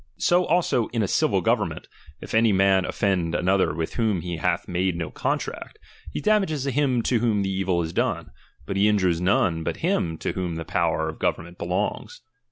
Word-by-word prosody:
So 175 +1 +3
also 160 -9 +1
in 115 -2 -1
a - - 0
civil - - +2
govern - - +2
ment, - - -9 0.3
if - - -8
any 110 0 +4
man 95 -1 +3
offend 90 -4 0
another 95 +2 +2
with 80 +1 -4
whom 110 -7 0
he 85 -1 -4
hath 80 - -1
made 90 0 0
no 85 -2 -4
contract, - - -3 0.3
he - - -3
damages 195 -10 +1
him 135 -3 +1
to 120 -1 +1
whom 110 -3 +1
the 95 - -1
evil 95 -2 0
is 80 +1 -5
done; - - -1 0.3
but 100 - -3
he 100 +2 +4
injures 95 -5 +2
none 90 -3 +2
but - - -3
him 90 - 0
to - - -2
whom 90 -3 -3
the 80 0 -5
power 80 0 0
of 80 - -6
government 85 +2 -2
belongs. 90 +4 -3
95 Hz, 195 wpm, -24 LUFS, 85-115 Hz, 0.3 s, any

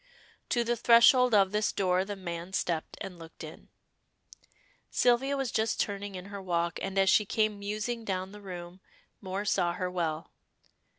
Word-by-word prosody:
To 240 - +2
the 240 +1 0
threshold 235 +1 +6
of 195 -2 +4
this 210 0 +1
door 185 -1 +1
the 205 0 -5
man 175 -1 -6
stepped 170 -4 -2
and 190 -4 -7
looked 165 0 -11
in. - - -11 1.2
Sylvia 260 +3 +2
was 270 -3 -2
just 220 0 0
turning 200 -1 -2
in 180 0 -7
her 200 - -5
walk, 170 -2 -1
and 195 0 -4
as 195 0 +4
she 210 - +5
came 215 0 0
musing 215 +3 -3
down 190 -2 -3
the 210 0 -11
room, 180 -2 -8 0.4
Moor 195 +1 -4
saw 175 -4 +1
her 180 +1 -3
well. 165 -3 -3
195 Hz, 170 wpm, -29 LUFS, 180-215 Hz, 1.2 s, threshold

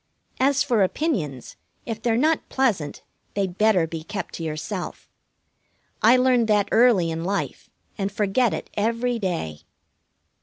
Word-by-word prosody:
As 275 +1 +3
for 230 -4 +1
opinions, 185 - -1 0.3
if 225 -2 -5
they're 230 -1 +1
not 310 +5 +1
pleasant 210 - 0 0.3
they'd 195 -3 -2
better 210 -6 +4
be 165 -1 -6
kept 195 +1 -5
to 165 - -5
yourself. 160 +5 -5 0.9
I 235 +4 +6
learned 250 -2 +3
that 205 -2 +3
early 220 -8 +4
in 165 0 -3
life 195 +3 -3 0.3
and 195 0 -1
forget 210 +4 +1
it - - -5
every 230 +3 0
day. 165 - -3
210 Hz, 140 wpm, -24 LUFS, 175-240 Hz, 0.9 s, I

